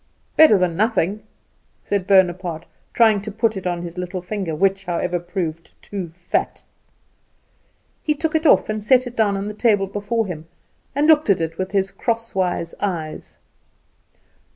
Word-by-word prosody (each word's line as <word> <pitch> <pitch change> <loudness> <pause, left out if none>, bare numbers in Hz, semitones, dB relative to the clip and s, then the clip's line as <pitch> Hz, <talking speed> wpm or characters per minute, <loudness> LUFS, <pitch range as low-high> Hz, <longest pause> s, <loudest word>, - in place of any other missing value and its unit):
"Better 310 -10 +7
than 180 -3 0
nothing!" 210 -1 +1 0.6
said 200 -2 -2
Bonaparte, 180 -3 +2 0.3
trying 220 -4 +4
to 215 +1 -6
put 220 +1 0
it 190 -1 -4
on 175 -1 -2
his 175 +1 -7
little 180 +1 -4
finger, 185 -4 -3
which, 195 +3 +1
however, 175 0 -1
proved 170 -2 -5
too 190 -4 -6
fat. 180 0 -2 1.4
He 300 - 0
took 315 +1 -2
it 320 0 +2
off - - +5
and 215 -1 -3
set 255 +4 +4
it 245 0 -8
down 205 -3 +2
on 195 +1 -4
the 210 - -4
table 210 -2 +2
before 205 +3 -2
him, 165 -4 -7 0.5
and 290 +1 +2
looked 310 -5 +4
at 195 - +4
it 165 +1 -4
with 185 0 -2
his 195 -1 0
crosswise 190 -8 -2
eyes. 165 -6 -4
195 Hz, 160 wpm, -21 LUFS, 175-215 Hz, 1.4 s, Better